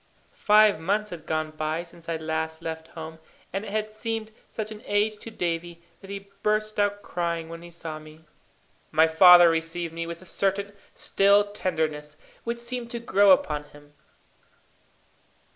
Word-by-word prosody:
Five 210 -4 +5
months 205 +5 -1
had 160 -3 -9
gone 155 0 -1
by 155 +2 -2
since 170 -1 -13
I 165 - -1
last 160 0 -3
left 160 0 -5
home, 160 0 -7 0.3
and 195 +2 -2
it - - -6
had 215 +1 -2
seemed 220 0 -4 0.2
such 215 -1 -5
an 215 0 -8
age 210 +1 +1
to 230 - -7
Davie, 170 -4 -3 0.2
that 195 - -13
he 200 0 -7
burst 215 0 0
out 205 0 +1
crying 170 -3 -3
when 165 0 -8
he 175 - -11
saw 165 -2 -7
me. 155 +1 -15 0.7
My 160 +1 +5
father 175 +2 +9
received 165 +1 -1
me 165 0 -4
with 170 0 -6
a - - -15
certain 200 +2 -1 0.2
still 200 +1 +3
tenderness, 155 -6 -2 0.3
which 235 0 -3
seemed 240 0 -4
to 235 - -4
grow 205 -3 +4
upon 150 -5 +3
him. 145 0 -18
175 Hz, 165 wpm, -26 LUFS, 160-205 Hz, 0.7 s, father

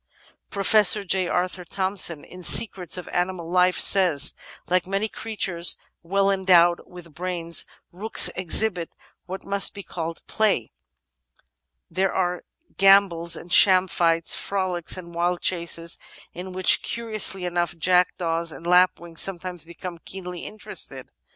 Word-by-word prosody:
Professor 205 +1 +3
J. 185 -1 0
Arthur 180 +1 -2
Thomson, 185 -3 -2
in 180 - -13
Secrets 180 -2 +4
of 180 - -8
Animal 175 -1 -3
Life, 180 0 +2
says: 175 -8 +4 0.3
''Like 180 0 0
many 195 +3 -1
creatures 195 -6 -2 0.2
well 195 +3 0
endowed 180 -3 +3
with 175 -3 -14
brains, 170 0 -3 0.2
rooks 205 +6 +3
ex 185 +1 +4
hibit 180 -7 -3 0.4
what 190 +1 -8
must 200 0 +2
be 200 - -8
called 165 -2 -7
play. 210 - -1 1.2
There 190 +2 -1
are 180 -1 -2 0.3
gambols 195 -4 +3
and 170 +2 -5
sham 185 -1 +6
fights, 165 -2 +1
frolics 185 -3 -3
and 170 -2 -11
wild 175 +1 -1
chases, 170 -1 -2 0.3
in 180 +2 -8
which, 185 0 +4
curiously 215 -5 -3
enough, 175 -1 -2
jack* 180 +1 +1
daws 165 -1 -2
and 165 - -11
lapwings 175 -1 +1
sometimes 180 -2 -4
become 170 +1 -9
keenly 180 0 -8
interested. 215 - -4
180 Hz, 130 wpm, -23 LUFS, 170-190 Hz, 1.2 s, sham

